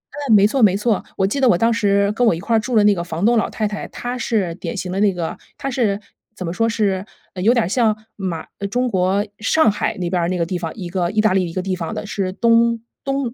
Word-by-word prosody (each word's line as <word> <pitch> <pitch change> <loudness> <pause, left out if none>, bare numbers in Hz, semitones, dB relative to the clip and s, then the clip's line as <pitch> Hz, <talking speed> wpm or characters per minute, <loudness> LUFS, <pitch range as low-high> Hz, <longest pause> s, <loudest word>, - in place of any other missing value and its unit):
嗯， 285 -6 0
没 200 0 +6
错 255 +4 +1
没 195 -2 +5
错。 215 -1 0
我 190 - +2
记 245 +8 -1
得 260 -3 +4
我 175 - +4
当 230 +3 +2
时 200 -2 +2
跟 245 +3 +1
我 170 - +4
一 - - -6
块 230 +5 0
儿 - - +5
住 240 +2 -3
的 210 - +5
那 205 0 +5
个 170 -2 -3
房 170 +3 -3
东 240 +1 +4
老 - - +1
太 215 -1 -2
太， 205 0 -5
她 245 +1 -5
是 200 -8 -1
典 210 +3 -5
型 180 -1 -4
的 195 - -2
那 205 -1 +4
个 170 -2 -3 0.2
她 275 -1 -4
是 215 -5 0 0.4
怎 185 - -6
么 170 - -3
说 225 +3 +1
是 200 -4 0 0.3
呃， 180 - -5
有 225 +5 +4
点 235 -6 +2
儿 - - -3
像 220 0 +2 0.2
马 180 -5 -4
呃， 200 - -2
中 250 +5 0
国 195 0 +1
上 225 +2 +3
海 - - -2
那 175 -2 -2
边 180 -2 +1
儿 170 - 0
那 185 - -1
个 170 - 0
地 180 - -4
方， 165 -2 -4
一 185 -5 -6
个 175 -1 -1
意 215 +2 -1
大 215 -3 +3
利 185 -3 +1
一 - - -9
个 185 - -1
地 190 -1 -1
方 165 -3 -4
的， - - -4
是 195 -2 -2
东 230 +1 +3 0.2
东 275 -3 -2
205 Hz, 310 characters per minute, -20 LUFS, 185-230 Hz, 0.4 s, 没